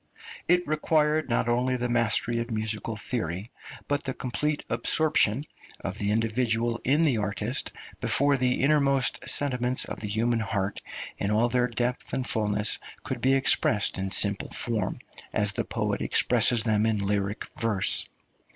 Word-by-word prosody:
It 180 +1 +3
required 155 0 +1
not 115 0 +1
only 125 +2 +1
the 125 0 -2
mastery 120 0 +1
of 115 +1 -4
musical 110 0 -2
theory, 100 -2 -4 0.4
but 145 0 -1
the 130 -2 -3
complete 150 +4 -2
absorption 130 0 +2 0.4
of - - -6
the 100 - -1
individual 115 +1 0
in 145 +6 +2
the 135 -8 +2
artist 105 +5 -2 0.3
before 140 +1 +3
the 125 -1 0
innermost 140 -2 +2
sentiments 125 -3 +2
of - - -7
the 105 - -5
human 115 +3 0
heart 100 -3 -2 0.4
in 100 - -1
all 110 +3 +2
their 125 0 +1
depth 120 +1 -3
and 130 - -1
fulness 105 -2 +1 0.2
could - - -5
be 135 +1 +3
expressed 105 -7 +2
in 95 0 -2
simple 100 +1 +2
form, 110 -5 -2 0.4
as 105 -1 +2
the 105 - -2
poet - - -2
expresses 120 -3 +3
them 110 -1 +1
in 105 -3 0
lyric 100 +1 -2
verse. 110 -5 0
120 Hz, 150 wpm, -26 LUFS, 105-130 Hz, 0.4 s, It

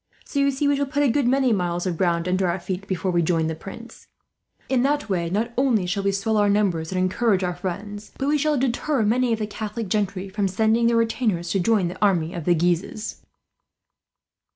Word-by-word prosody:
"So 285 - -3
you 280 0 +3
see, 280 +1 0
we 285 - +3
shall 280 0 -1
put 290 +1 0
a 275 - +3
good 275 0 +1
many 260 -1 +3
miles 175 -2 -1
of 180 -2 -1
ground 170 0 0
under 185 +1 +1
our 170 +2 -1
feet, 185 +2 -5
before 185 -1 -1
we 175 -1 +2
join 165 -1 +1
the 160 - -1
Prince. 195 +8 -11 0.6
In 260 -2 +2
that 285 -1 0
way 170 -3 0
not 220 +6 -1
only 240 -8 +2
shall 190 +3 -1
we 200 0 +1
swell 205 +3 0
our 205 -1 +3
numbers 190 -6 +1
and 185 - -2
encourage 190 +2 +1
our 180 0 -1
friends, 200 +4 -6
but 270 - -2
we 300 +1 +2
shall 300 0 +1
deter 260 +1 0
many 240 +3 +2
of 225 - +1
the 215 - -2
Catholic 215 0 -5
gentry 195 -2 -1
from 200 +1 -1
sending 220 +4 +2
their 235 0 +3
retainers 220 -7 0
to 195 - +1
join 200 -1 +2
the 175 - -7
army 175 -5 +2
of 170 -3 -5
the 175 - +4
Guises." 175 +5 -2
205 Hz, 225 wpm, -23 LUFS, 180-235 Hz, 0.6 s, the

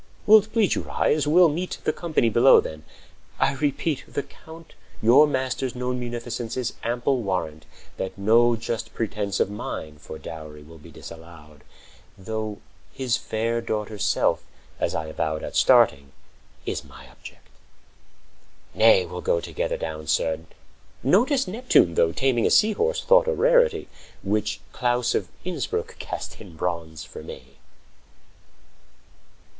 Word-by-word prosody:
Will't 215 0 +6
please 220 -4 +2
you - - -1
rise? 150 -1 0
We'll 175 +3 +6
meet 170 +4 -3
The - - +1
company 160 -8 0
below, 120 +4 +6
then. 80 -1 -6 0.6
I 140 - +2
repeat, 145 +1 -1
The 140 - -3
Count 165 0 -15 0.3
your 130 +7 +6
master's 130 -2 -2
known 125 0 -2
munificence 120 -1 -5
Is 125 -2 -2
ample 120 +2 0
warrant 80 -6 -3 0.3
that 95 +4 -5
no 115 +4 +4
just 115 0 -5
pretense50 105 -3 -2
Of - - +1
mine 80 -7 -6
for 80 - -9
dowry 75 -2 -9
will 80 +2 -14
be 75 - -14
disallowed; 80 -3 -13 0.6
Though 110 +1 -4 0.3
his 130 -3 -1
fair 115 +2 -2
daughter's 105 -2 -3
self, - - +1 0.4
as - - -1
I 80 - -2
avowed 80 0 -3
At - - -6
starting, 70 0 +4 0.5
is - - -3
my 65 - -14
object. - - -14 1.3
Nay, 110 -4 +5
we'll 90 +1 -7
go 85 - +1
Together - - -3
down, 80 -1 -6
sir. 80 0 +1 0.6
Notice 250 - +3
Neptune, 210 - +3
though, 80 0 +3
Taming 125 +2 +1
a - - +2
sea 220 +1 +5
horse, 480 - 0
thought - - +5
a 485 - +2
rarity,55 - - +3 0.4
Which 105 +1 -1
Claus 120 -1 0
of - - -1 0.2
Innsbruck 170 -9 -3
cast - - -6
in 80 - -12
bronze 80 -2 -4
for - - -10
me! - - -12
115 Hz, 140 wpm, -24 LUFS, -, 1.3 s, Will't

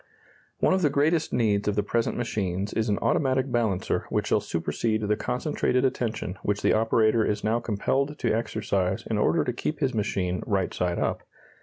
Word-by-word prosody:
] - - -33
One - - +4
of 190 - +2
the 150 - +3
greatest 150 +3 +1
needs 105 -4 +1
of 105 - +1
the 105 - +1
present 115 +3 -1
machines 100 -4 -2
is 110 0 0
an 100 - +1
automatic 130 -2 +1
balancer 110 -6 0
which - - 0
shall - - +2
supersede 110 +6 -1
the 105 0 +1
concentrated 125 +1 0
attention 110 -7 -2
which 105 0 -1
the - - +4
operator 110 0 +3
is 105 -1 -1
now 110 +2 +1
compelled 135 +7 -1
to - - 0
exercise 100 -4 -1
in 110 -2 -1
order - - +3
to 125 - -2
keep 150 +5 -3
his 135 -4 0
machine 95 -4 -1
right 95 -3 0
side 90 -1 -1
up. - - -1
110 Hz, 190 wpm, -26 LUFS, 100-125 Hz, -, One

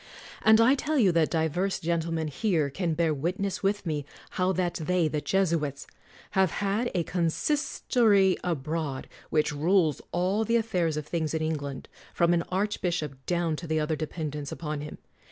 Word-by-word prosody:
And 220 0 +6
I 230 +4 +6
tell 300 +2 -1
you 205 -8 +5
that 165 -2 +2
divers 165 +4 0
gentle 165 0 -1
men 160 -1 -1
here 155 -2 0
can 170 +1 -1
bear 165 -1 +2
witness 180 +6 -2
with 200 +1 0
me 150 -3 -1 0.3
how 185 0 +1
that 180 -2 0
they, 180 0 +2
the 150 -1 -2
Jesuits, 165 -8 0 0.5
have 190 -2 +3
had 205 +7 -1
a 175 - +2
consistory 195 - +2
abroad 155 -4 -2 0.2
which 155 -1 +1
rules 160 0 +2
all 185 +5 +1
the 230 +2 +1
affairs 180 -9 +1
of 150 - -3
things 160 -1 -2
in 160 - -1
England, 145 -4 -3 0.3
from 170 0 +3
an 170 - +2
archbishop 175 -8 -2
down 170 -2 +1
to 170 - -7
the 155 0 +1
other 155 +1 0
dependents 150 -2 -4
upon 150 -2 -4
him. 150 - -7
170 Hz, 170 wpm, -27 LUFS, 155-190 Hz, 0.5 s, And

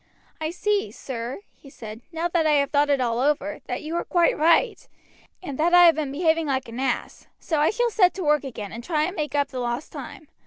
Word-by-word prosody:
"I 315 0 -2
see, 405 +4 -1
sir," 245 +4 -6
he 275 - -16
said, 220 -3 -10
"now 330 +1 -1
that 330 -2 +1
I 305 - +4
have 280 -1 +2
thought 290 0 +2
it 280 -1 +3
all 235 -2 0
over, 295 +2 0
that 245 - -4
you 315 +2 -4
are - - -1
quite 345 -2 +2
right, 340 +11 +2 0.6
and 285 -6 -6
that 345 +3 +4
I 355 0 +8
have 335 - +7
been 300 -3 -3
behaving 320 +1 +1
like 265 -2 -1
an 230 +2 -7
ass, 265 -2 -3
so 315 -3 -1
I 300 - +4
shall 480 +1 0
set 365 -4 +3
to 380 - -4
work 300 -2 +2
again 220 -7 -7
and 235 +1 -8
try 305 +1 0
and 365 +5 -2
make 300 -2 -3
up 285 -1 +1
the 260 - -5
lost 240 +3 -3
time. 310 - -9
300 Hz, 240 wpm, -24 LUFS, 265-335 Hz, 0.6 s, I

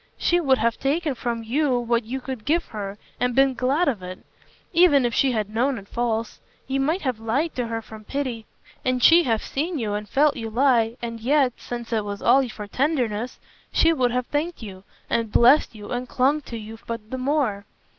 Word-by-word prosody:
She 350 - +2
would 270 -6 +3
have 235 -1 0
taken 295 +2 0
from 235 -2 -3
you 260 +3 +1
what 235 -1 0
you 260 +4 -4
could 255 -4 -6
give 335 +7 +1
her 205 -2 -6 0.2
and 250 -1 0
been 270 0 +4
glad 270 +7 +1
of 235 -9 0
it, 185 0 -7 0.6
even 330 -7 +5
if 240 - 0
she 270 - +3
had 215 -3 -1
known 255 +3 +1
it 200 -1 -10
false. 230 -1 -2 0.3
You 270 +1 -1
might 315 +8 0
have 255 -5 -1
lied 260 +9 -1
to 245 -2 -2
her 225 0 -4
from 215 -1 -12
pity, 255 -5 -4 0.4
and 255 -1 0
she 335 +1 +7
have 225 -3 0
seen 320 +5 -2
you 215 -5 -2
and 210 0 -4
felt 290 +1 +3
you 225 -1 -5
lie, 235 -1 +2
and 230 -1 -4
yet 260 +1 +2
since 240 -1 -6
it 220 -2 +1
was 205 0 -5
all 265 -2 +4
for 210 -1 -7
tenderness 245 -2 -1 0.3
she 330 0 +4
would 255 -5 +2
have 250 +1 -1
thanked 300 0 -3
you 190 -2 -10 0.2
and 230 -2 -1
blessed 245 +1 +5
you 205 -1 -9
and 245 0 -3
clung 275 +4 +2
to 235 - -5
you 220 +1 -9
but 230 -2 -6
the 260 - -3
more. 255 -7 0
245 Hz, 210 wpm, -24 LUFS, 225-275 Hz, 0.6 s, she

